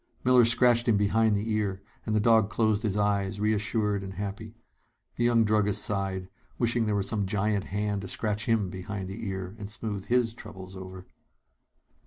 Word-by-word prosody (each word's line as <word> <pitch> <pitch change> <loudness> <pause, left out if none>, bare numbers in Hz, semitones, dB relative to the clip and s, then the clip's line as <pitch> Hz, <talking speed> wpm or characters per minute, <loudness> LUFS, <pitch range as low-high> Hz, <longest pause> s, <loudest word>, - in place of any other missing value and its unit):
Miller 125 -1 +6
scratched 120 +1 +4
him 110 -3 +4
behind 105 +1 +2
the 105 +2 -2
ear, 105 -3 -1 0.3
and 110 - 0
the - - +3
dog 110 -1 +4
closed 110 -2 +1
his 105 -3 -1
eyes, 100 -1 0
reassured 105 -1 0
and 95 -1 -7
happy. 105 +3 -6 0.6
The 120 - 0
young 120 -1 +4
druggist 105 -1 +2
sighed, 95 -2 -2 0.3
wishing 120 -1 +1
there 105 - +1
were 100 - 0
some 100 -1 -1
giant 105 0 0
hand 105 0 -2
to 95 - -7
scratch 105 +2 -2
him 110 -5 +1
behind 95 +1 -5
the 100 +3 -6
ear 95 0 -5
and 100 -1 -6
smooth 105 -1 -3
his 120 -2 +1
troubles 95 -5 -11
over. 95 0 -9
105 Hz, 180 wpm, -28 LUFS, 100-110 Hz, 0.6 s, Miller